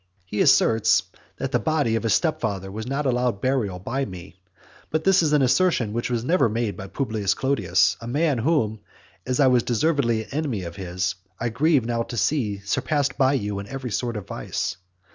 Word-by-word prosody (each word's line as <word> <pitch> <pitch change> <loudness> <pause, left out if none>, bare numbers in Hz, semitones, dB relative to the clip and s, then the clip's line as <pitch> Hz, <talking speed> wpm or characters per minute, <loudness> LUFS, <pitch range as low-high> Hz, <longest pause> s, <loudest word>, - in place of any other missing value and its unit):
He 105 +3 -2
asserts 110 -1 +4 0.3
that 135 -1 -3
the - - +2
body 150 -8 +1
of 115 - 0
his 115 -3 +2
stepfather 100 - -1
was 110 +3 -6
not 140 +3 -2
allowed 125 -4 +1
burial 120 -7 0
by 130 +9 -3
me. 95 -3 -9 0.5
But 155 0 -1
this 195 0 +5
is 155 -3 +1
an 150 -2 +4
assertion 130 - +2
that 120 +2 -2
was 120 -2 -1
never 165 -3 +3
made 110 -1 -2
by 95 - -8
Publius 110 -4 -1
Clodius, 140 +1 +2
a 115 - -7
man 145 +1 +1
whom, 115 -6 +1 0.5
as 130 -1 0
I 140 - +6
was 125 -2 +4
deservedly 120 -3 +1
an - - -21
enemy 135 -9 -2
of 85 -1 -7
his, 90 -1 -2 0.3
I 115 - -1
grieve 145 +1 +2
now 115 0 -1
to 120 +1 -5
see 105 -2 0
surpassed 140 +5 0
by 135 0 +3
you 105 -6 -2
in 100 - -7
every 130 0 -5
sort 120 0 -2
of 105 - -6
vice. - - -3
120 Hz, 200 wpm, -24 LUFS, 105-140 Hz, 0.5 s, I